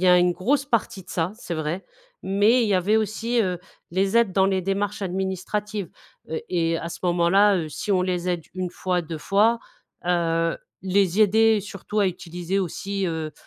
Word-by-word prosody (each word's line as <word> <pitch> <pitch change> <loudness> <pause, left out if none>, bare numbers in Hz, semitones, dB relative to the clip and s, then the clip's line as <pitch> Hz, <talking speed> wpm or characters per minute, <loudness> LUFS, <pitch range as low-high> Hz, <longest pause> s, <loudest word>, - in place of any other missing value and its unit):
y - - +4
a 180 - +7
une 175 0 +3
grosse 260 +11 +1
partie 220 -8 -1
de - - -24
ça, 170 +3 -1
c'est 175 -7 -5
vrai 155 +4 -3 0.4
mais 210 +6 +3
il 220 - +1
y 200 - +3
avait 200 +4 +3
aussi, 225 +3 0
heu, 180 -4 0 0.3
les 195 +3 0
aides 230 -5 +3
dans 190 0 +3
les 190 -1 +2
démarches 200 +3 -2
administratives, 190 +1 -3 0.4
heu, 160 - -3
et 165 -2 +1
à 170 +1 -5
ce - - -7
moment-là, 180 +4 +4
heu, 160 -3 -3
si 205 - -5
on 185 -1 +3
les 180 -1 -1
aide 175 -2 -1
1 185 -1 -3
fois, 180 0 -1
2 165 -1 -6
fois, 205 +8 +3 0.5
heu, 165 -1 +1 0.2
les 190 0 +2
aider 220 +1 +4
surtout 205 +1 -5
à 200 - +4
utiliser 180 +1 -3
aussi, 195 +1 -2
heu, 160 -2 -3
190 Hz, 190 wpm, -24 LUFS, 175-205 Hz, 0.5 s, a